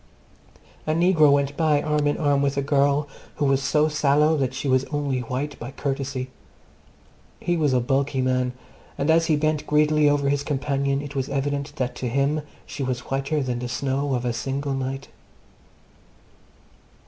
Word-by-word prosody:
A 155 - +2
negro 165 -4 +5
went 140 0 +1
by 155 -2 +2
arm 150 0 0
in 145 - +1
arm 145 -3 +2
with 140 0 0
a 140 - +1
girl 140 +1 +2 0.3
who 145 - 0
was 135 -1 +2
so 150 +3 +2
sallow 150 +1 +3
that 135 -3 -1
she 135 - -3
was 130 0 +3
only 145 -3 -2
white 130 +4 -4
by 120 - -6
courtesy. 135 -1 -3 1.1
He 175 - 0
was 155 -4 +2
a 130 - +3
bulky 135 +2 0
man, 130 -1 +1 0.4
and 145 +3 +2
as 165 +1 +3
he 155 - +3
bent 155 0 0
greedily 150 0 +4
over 145 -1 +1
his 140 0 +1
companion 140 -1 -1
it 145 0 -8
was 135 -1 -2
evident 140 +1 -2
that 125 -3 -2
to 125 - -3
him 140 +4 +1 0.2
she 140 - -7
was 130 -2 -3
whiter 135 +2 0
than 125 -2 -2
the 125 0 -4
snow 135 +2 -1
of 125 0 -3
a 120 - 0
single 135 +4 -2
night. 135 +1 -4
140 Hz, 175 wpm, -24 LUFS, 135-150 Hz, 1.1 s, negro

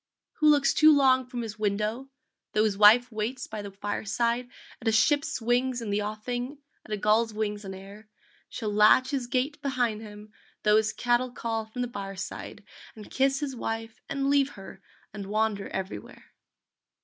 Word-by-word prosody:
Who 305 -1 +5
looks 285 -2 +4
too 310 0 +7
long 260 -3 +4
from 245 -2 -5
his 215 -1 -7
window 215 +5 -1 0.4
Tho 215 - +3
his 215 -2 +1
wife 220 +5 +6
waits 225 +4 -3
by 215 -1 -6
the 200 - -7
fireside 225 +5 -2 0.3
At 225 - -5
a - - +4
ship's 290 +7 +2
wings 245 +2 +1
in 225 -3 -4
the 205 +1 +1
offing, 245 +6 -4 0.3
At - - -14
a 210 - 0
gull's 215 +2 +2
wings 210 -1 -2
on 190 -1 -7
air, 200 +3 -12 0.4
Shall 210 -2 -4
latch 215 +5 +5
his 265 -4 -2
gate 265 +4 -1
behind 245 -6 -1
him, 210 0 -11 0.3
Tho 210 0 +5
his 220 0 +2
cattle 245 +1 +1
call 225 -2 -3
from 245 +3 -4
the - - -2
byre 195 -4 -6
side, 190 - -7 0.3
And 215 -2 -12
kiss 270 +1 +1
his 275 -3 -3
wife 225 -1 -5
and 275 0 -1
leave 280 0 +2
her 195 0 -11 0.3
And 200 -2 -7
wander 215 -1 -1
everywhere. 190 0 -7
225 Hz, 180 wpm, -27 LUFS, 210-255 Hz, 0.4 s, too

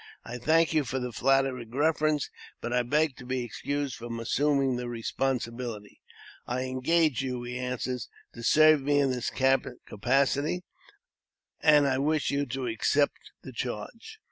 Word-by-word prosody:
I 120 +1 -6
thank 160 +5 +3
you 155 -2 +3
for 130 0 -3
the 125 -1 -3
flattering 135 -2 +1
preference, 150 +2 +1 0.3
and 120 - -2
I 125 - +3
beg 145 +3 +1
to 125 - -10
be 130 -1 -1
excused 140 +3 -3
from 115 0 -6
assuming 135 +2 +1
the 125 0 -4
responsibility." 120 -2 -3 0.5
"I 125 +1 -1
engaged 140 +3 +1
you," 125 -2 -3
he 125 +1 -5
answered, 125 0 -3 0.3
"to 115 - -9
serve 155 +4 +5
me 145 +1 +2
in 140 -2 +3
this 125 -2 -2
capacity, 135 - 0 1.0
and 150 -1 +5
I 130 -1 +1
wish 150 +1 +1
you 140 0 0
to 130 +1 -3
accept 125 +5 0
the 130 - -8
charge." 125 - -6
130 Hz, 150 wpm, -28 LUFS, 125-145 Hz, 1.0 s, serve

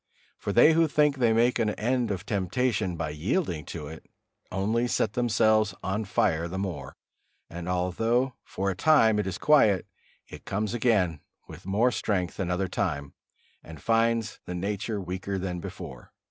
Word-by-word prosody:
For - - -3
they 120 +10 +6
who 165 0 +4
think 150 -2 +2
they 120 -3 +3
make 120 +2 +3
an 110 -2 +2
end 120 +1 0
of 95 -1 -3
temptation 100 0 0
by 80 -2 -3
yielding 85 - -1
to 80 -3 -6
it, 80 +2 -9 0.5
only 110 +6 0
set 110 -3 0
themselves 110 -3 +2
on 100 +4 -2
fire 85 -3 +1
the 90 +2 -5
more; 95 -5 -5 0.6
and 85 +1 -6
although 115 +8 0
for 95 +1 -2
a - - -5
time 110 - +4
it 105 - -1
is 95 -1 -3
quiet, 110 - +4 0.4
it - - -11
comes 105 +2 -2
again 100 -10 +1 0.3
with - - -11
more 110 +6 +3
strength 95 -5 -2
another 90 0 -1
time, 70 -5 -2 0.5
and 80 -2 -11
finds 115 +1 +1
the 90 - -5
nature 100 +3 -2
weaker 95 +1 -4
than 90 -1 -3
before. 85 -8 -9
100 Hz, 160 wpm, -27 LUFS, 90-115 Hz, 0.6 s, they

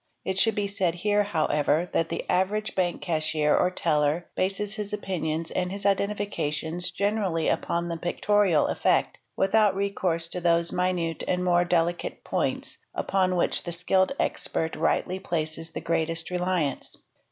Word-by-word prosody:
It 190 0 0
should 225 +2 +4
be 205 -1 0
said 190 -4 0
here, 205 +3 +2
however, 160 -4 +1
that 165 - 0
the - - -4
average 205 +4 0
bank 180 -2 -1
cashier 155 -2 +1
or 180 - +3
teller 150 -1 +1
bases 200 +2 -1
his 210 -1 -4
opinions 165 -5 -2
and 180 0 -1
his 200 +1 -4
identifications 185 -4 -1
generally 195 -3 0
upon 170 0 0
the 170 -1 -3
pictorial 175 -1 +2
effect, - - +1 0.2
without: 205 0 +3
recourse 190 -4 -1
to 180 - -4
those 170 0 +3
minuter 180 -3 -1
and 180 0 0
more 175 -1 +3
delicate 175 0 0
points - - -2 0.2
upon 185 -1 +1
which 175 - +1
the 175 - -5
skilled 185 +5 +2
expert 160 0 -1
rightly 185 +1 0
places 165 -2 -3
the - - -6
greatest 165 +1 -1
reliance. 180 -6 -1
180 Hz, 150 wpm, -26 LUFS, 165-195 Hz, 0.2 s, should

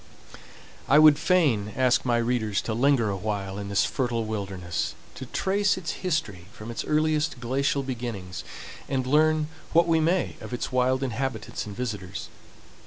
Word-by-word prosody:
I 140 - +6
would 155 -1 +7
fain 140 - +2
ask 130 -1 +2
my 120 -2 +2
readers 115 -3 0
to 110 - -2
linger 120 -2 +3
awhile 100 0 -3
in 100 -1 -5
this 100 0 +2
fertile 120 -3 -1
wilderness, 95 -5 -3 0.2
to - - -8
trace 200 +1 +1
its 170 -4 -3
history 150 - -2
from 115 -1 -8
its 115 - -4
earliest 155 -2 +1
glacial 135 +3 0
beginnings, 115 -9 -5 0.5
and 130 -2 0
learn 155 +2 +3 0.3
what 170 +1 +5
we 165 -1 +3
may 170 +3 +1
of 125 - -5
its 125 - -4
wild 130 +1 +2
inhabitants 130 -2 -3
and 100 - -7
visitors. 100 -6 -5
125 Hz, 155 wpm, -26 LUFS, 105-150 Hz, 0.5 s, would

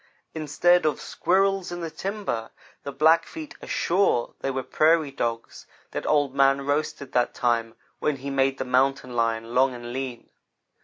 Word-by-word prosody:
Instead 165 +3 +2
of 150 - -1
squirrels 195 0 +1
in 175 0 -5
the 165 -1 -4
timber, 195 - -4 0.3
the 140 - -6
Black 160 +4 +4
feet 315 -2 -8
are - - -9
sure 175 -9 +1
they - - -2
were 130 -1 -2
prairie 155 +1 +2
dogs 115 -4 -4 0.2
that - - -4
Old 145 -3 +2
man 135 0 +3
roasted 145 -1 -2
that 125 -1 +1
time 115 -2 0 0.2
when 150 - 0
he 140 +1 -6
made 135 0 +1
the 130 - -3
mountain 130 0 +1
lion 115 0 -1
long 130 0 +3
and 120 0 -7
lean. 130 -2 -6
135 Hz, 165 wpm, -25 LUFS, 125-160 Hz, 0.3 s, Black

